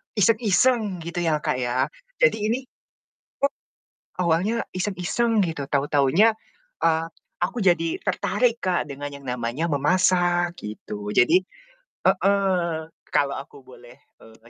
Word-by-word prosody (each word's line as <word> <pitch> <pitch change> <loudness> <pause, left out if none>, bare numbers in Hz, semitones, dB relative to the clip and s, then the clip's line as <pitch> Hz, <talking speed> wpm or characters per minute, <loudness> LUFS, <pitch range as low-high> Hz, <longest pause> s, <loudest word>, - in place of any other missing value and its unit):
iseng-iseng, 215 -2 +2
gitu 170 +1 -4
ya 155 -2 +1
Kak, 125 - 0
ya, 125 +2 0 0.3
jadi - - +5
ini 230 +3 +1 1.6
o 175 - +1
awalnya 195 +8 +1 0.2
iseng-iseng 205 +4 0
gitu, 160 -5 -3
tau-taunya, 145 +9 +3 0.5
eee, 165 0 +2 0.3
aku 185 +7 -1
jadi 165 -3 +2
tertarik 235 +3 0
Kak, 180 -2 0
dengan 145 0 -6
yang 140 - -14
namanya 125 +4 -2
memasak 175 +3 +2
gitu. 105 -1 -7
Jadi 165 +9 +5 0.7
heeh, 185 -4 +1 0.2
kalau 140 -1 +2
aku 140 0 -10
boleh, 125 -2 -15 0.2
eee, 115 +1 -18
170 Hz, 115 wpm, -24 LUFS, 140-195 Hz, 1.6 s, jadi